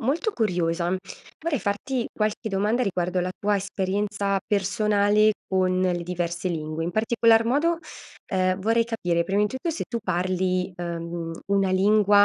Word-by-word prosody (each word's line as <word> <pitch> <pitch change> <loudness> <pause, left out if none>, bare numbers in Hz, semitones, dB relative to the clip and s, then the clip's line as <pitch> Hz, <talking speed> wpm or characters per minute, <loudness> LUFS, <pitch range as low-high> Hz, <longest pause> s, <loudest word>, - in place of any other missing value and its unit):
molto 315 - 0
curiosa, 175 - 0 0.5
vorrei 320 -6 -1
farti 230 +5 -1
qualche 215 0 -1
domanda 210 +5 +1
riguardo 180 -3 0
la 180 +1 -1
tua 205 +1 +1
esperienza 200 0 -1
personale 210 +1 +3
con 185 -1 +1
le 180 -2 +1
diverse 175 0 -2
lingue, 155 -1 -3
in 170 - -1
particolar 225 +2 +3
modo, 300 +8 +2 0.5
ehm, 185 0 +1
vorrei 230 +3 +2
capire 180 -7 0
prima 195 +4 +1
di - - +3
tutto 260 - -3
se 325 - -3
tu 235 - -2
parli, 185 0 0
uhm, 170 -1 -4 0.2
una 195 -1 +3
lingua 205 +1 +5
195 Hz, 145 wpm, -25 LUFS, 180-215 Hz, 0.5 s, lingua